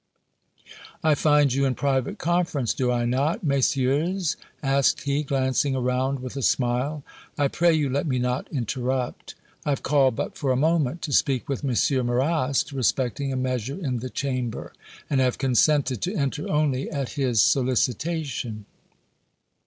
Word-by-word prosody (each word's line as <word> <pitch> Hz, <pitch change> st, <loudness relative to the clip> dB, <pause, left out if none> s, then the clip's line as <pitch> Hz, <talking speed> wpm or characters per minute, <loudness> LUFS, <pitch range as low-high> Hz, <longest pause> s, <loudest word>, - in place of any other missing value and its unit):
"I 155 Hz, -1 st, +4 dB
find 145 Hz, -2 st, +3 dB
you 140 Hz, +1 st, +1 dB
in 130 Hz, -2 st, 0 dB
private 135 Hz, -2 st, 0 dB
conference, 165 Hz, -, 0 dB
do 125 Hz, -1 st, 0 dB
I 120 Hz, -1 st, 0 dB
not, 135 Hz, +9 st, 0 dB
Messieurs?" 145 Hz, +5 st, +1 dB, 0.3 s
asked 135 Hz, 0 st, +2 dB
he, 140 Hz, +1 st, 0 dB
glancing 135 Hz, -1 st, 0 dB
around 130 Hz, +1 st, 0 dB
with 130 Hz, +1 st, -7 dB
a 135 Hz, -, -3 dB
smile. 130 Hz, +4 st, 0 dB, 0.3 s
"I 145 Hz, -, +3 dB
pray 170 Hz, +4 st, +2 dB
you 150 Hz, -2 st, +1 dB
let 140 Hz, +4 st, -1 dB
me 130 Hz, -3 st, 0 dB
not 125 Hz, +2 st, -2 dB
interrupt. 125 Hz, 0 st, -3 dB, 0.3 s
I -, -, -3 dB
have 140 Hz, -, -1 dB
called 135 Hz, -3 st, +3 dB
but -, -, -4 dB
for 135 Hz, -3 st, -1 dB
a -, -, +2 dB
moment 155 Hz, +1 st, +1 dB
to 145 Hz, -, -3 dB
speak 130 Hz, -3 st, +2 dB
with 140 Hz, +1 st, -3 dB
M. 130 Hz, 0 st, +1 dB
Marrast 135 Hz, +3 st, +1 dB
respecting 135 Hz, +1 st, 0 dB
a -, -, -2 dB
measure 130 Hz, +1 st, -2 dB
in 130 Hz, -9 st, -2 dB
the 130 Hz, +2 st, -5 dB
Chamber, 130 Hz, -4 st, -3 dB, 0.3 s
and 135 Hz, -3 st, +1 dB
have 125 Hz, -1 st, +1 dB
consented 135 Hz, -1 st, +2 dB
to 185 Hz, +4 st, -2 dB
enter 145 Hz, -1 st, -2 dB
only 145 Hz, -3 st, 0 dB
at 140 Hz, -4 st, -3 dB
his 130 Hz, -6 st, 0 dB
solicitation." 130 Hz, -3 st, 0 dB
135 Hz, 155 wpm, -25 LUFS, 125-145 Hz, 0.3 s, I